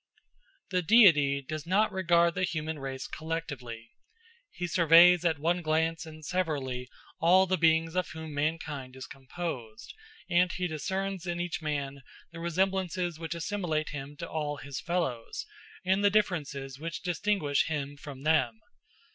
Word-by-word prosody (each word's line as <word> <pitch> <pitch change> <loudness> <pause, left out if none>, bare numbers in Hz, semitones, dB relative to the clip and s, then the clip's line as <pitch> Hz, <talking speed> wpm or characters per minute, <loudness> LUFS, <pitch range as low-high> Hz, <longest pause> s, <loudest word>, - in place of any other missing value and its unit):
The 180 -1 +2
Deity 155 -9 +6
does 155 +3 -6
not 205 +4 +3
regard 170 -2 +3
the 185 - -3
human 160 -3 -2
race 135 -1 -5
collectively. 140 -8 -5 0.6
He 180 - -5
surveys 170 +1 +6
at 165 -3 +2
one 170 +4 0
glance 160 +1 0
and 155 -1 -11
severally 140 -8 -2 0.3
all 185 +3 +5
the 185 0 +1
beings 160 0 +3
of 185 -1 0
whom 160 -1 -7
mankind 145 -3 -3
is 130 -1 -7
composed, 130 -5 -7 0.3
and 175 0 +3
he 180 - -2
discerns 190 +3 -3
in 175 0 -2
each 175 0 -3
man 140 -2 -3 0.3
the 165 - -9
resemblances 180 -1 -1
which 165 0 -4
assimilate 170 -3 -2
him 145 0 -7
to - - -5
all 150 -2 -3
his 140 -2 -6
fellows, 165 -10 -2 0.4
and 190 +2 +2
the 205 - +6
differences 145 -10 -1
which 165 +2 -5
distinguish 175 -5 +1
him 145 -3 -3
from 140 -1 -10
them. 130 -8 +2
160 Hz, 145 wpm, -29 LUFS, 145-175 Hz, 0.6 s, Deity